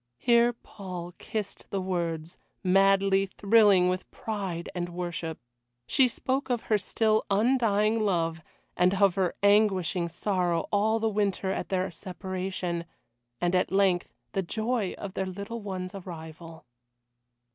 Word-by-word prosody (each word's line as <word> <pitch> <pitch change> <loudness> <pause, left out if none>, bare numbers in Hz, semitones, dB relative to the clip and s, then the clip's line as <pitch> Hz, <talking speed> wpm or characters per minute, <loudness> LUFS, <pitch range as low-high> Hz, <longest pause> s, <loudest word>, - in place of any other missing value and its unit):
Here 235 - +4
Paul 185 -6 -8
kissed 215 -3 -5
the 195 - -2
words, 170 -3 -3 0.3
madly 195 +1 +4
thrilling 200 -2 +4
with 185 0 -2
pride 195 -6 -4
and 175 -1 -3
worship. 170 -2 -4 0.5
She 265 - +4
spoke 265 +3 -2
of 240 -2 0
her 215 - +2
still 215 +2 +1
undying 215 0 +2
love, 165 -6 0 0.3
and 180 +2 +3
of 195 -1 +4
her 185 -2 0
anguishing 195 -4 +3
sorrow 175 -1 0
all 215 +2 +2
the 225 - +1
winter 200 -3 0
at - - -3
their 185 -1 0
separation, 185 -2 -4 0.5
and 175 0 +1
at 180 -1 +2
length 190 -2 +3 0.2
the 195 - 0
joy 220 +2 -1
of 195 -2 -6
their 190 -1 -2
little 200 +5 -6
one's 185 -2 -5
arrival. 165 -3 -9
190 Hz, 135 wpm, -28 LUFS, 180-210 Hz, 0.5 s, Here